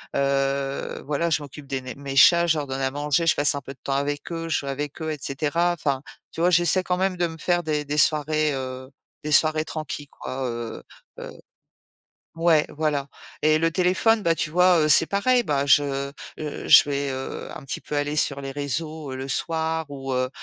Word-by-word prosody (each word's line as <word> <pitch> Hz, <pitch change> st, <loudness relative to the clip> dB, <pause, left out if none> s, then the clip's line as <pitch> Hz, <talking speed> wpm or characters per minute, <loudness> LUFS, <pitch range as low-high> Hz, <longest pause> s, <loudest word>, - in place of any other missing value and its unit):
Heu, 140 Hz, 0 st, -1 dB
voilà, 150 Hz, +4 st, -1 dB
je 150 Hz, -2 st, 0 dB
m'occupe 140 Hz, 0 st, -11 dB
des 135 Hz, -1 st, -3 dB
né 130 Hz, 0 st, -7 dB
mes 140 Hz, -1 st, -7 dB
chats, 170 Hz, +5 st, +6 dB
je 160 Hz, -2 st, +2 dB
leur 145 Hz, -, -2 dB
donne 135 Hz, 0 st, -4 dB
à 135 Hz, -, +1 dB
manger, 145 Hz, +3 st, 0 dB
je -, -, +4 dB
passe 145 Hz, 0 st, +3 dB
un 140 Hz, -, -4 dB
peu 135 Hz, +1 st, -9 dB
de -, -, -29 dB
temps 135 Hz, -, -2 dB
avec 145 Hz, +3 st, -2 dB
eux, 165 Hz, 0 st, -4 dB
je -, -, +2 dB
joue 140 Hz, -, -9 dB
avec 145 Hz, +3 st, -4 dB
eux 160 Hz, -, -2 dB
et 150 Hz, -, -5 dB
cetera. 155 Hz, +5 st, 0 dB
Enfin, 140 Hz, -5 st, -2 dB, 0.3 s
tu 165 Hz, -, -5 dB
vois? 175 Hz, -, +4 dB
J'essaie 175 Hz, +1 st, +3 dB
quand 180 Hz, -1 st, -1 dB
même 190 Hz, 0 st, 0 dB
de 175 Hz, -1 st, 0 dB
me 160 Hz, 0 st, -9 dB
faire 175 Hz, +2 st, +1 dB
des 150 Hz, -3 st, -2 dB
des 150 Hz, +1 st, -1 dB
soirées, 155 Hz, +1 st, +2 dB
heu, 130 Hz, 0 st, -6 dB, 0.3 s
des 150 Hz, -, -4 dB
soirées 155 Hz, +1 st, +3 dB
tranquilles 150 Hz, -2 st, -6 dB
quoi, 130 Hz, -1 st, -6 dB
heu, 115 Hz, -1 st, -5 dB, 0.4 s
heu -, -, -8 dB, 1.1 s
ouais, 165 Hz, -2 st, +3 dB
voilà 150 Hz, -2 st, -2 dB, 0.4 s
et 155 Hz, 0 st, +4 dB
le 165 Hz, 0 st, +1 dB
téléphone, 190 Hz, +5 st, +2 dB
bah, 165 Hz, -3 st, +2 dB
tu 155 Hz, -, -2 dB
vois? 180 Hz, +1 st, +4 dB
Heu, 155 Hz, -, +2 dB
c'est 160 Hz, -, +6 dB
pareil. 240 Hz, +7 st, +2 dB
Bah, 140 Hz, -4 st, 0 dB
je, 140 Hz, -1 st, +2 dB, 0.3 s
heu, 150 Hz, -1 st, -6 dB
je -, -, +9 dB
vais, 140 Hz, 0 st, -1 dB
heu, 130 Hz, 0 st, -6 dB
un -, -, -9 dB
petit 135 Hz, -, -5 dB
peu 150 Hz, -, -6 dB
aller 145 Hz, +1 st, -1 dB
sur 140 Hz, -1 st, 0 dB
les 135 Hz, 0 st, -5 dB
réseaux, 145 Hz, +1 st, -3 dB
heu, -, -, -5 dB
le 135 Hz, +1 st, -6 dB
soir 160 Hz, +2 st, 0 dB
ou 135 Hz, -1 st, -6 dB
heu, 130 Hz, 0 st, 0 dB
150 Hz, 220 wpm, -24 LUFS, 140-165 Hz, 1.1 s, je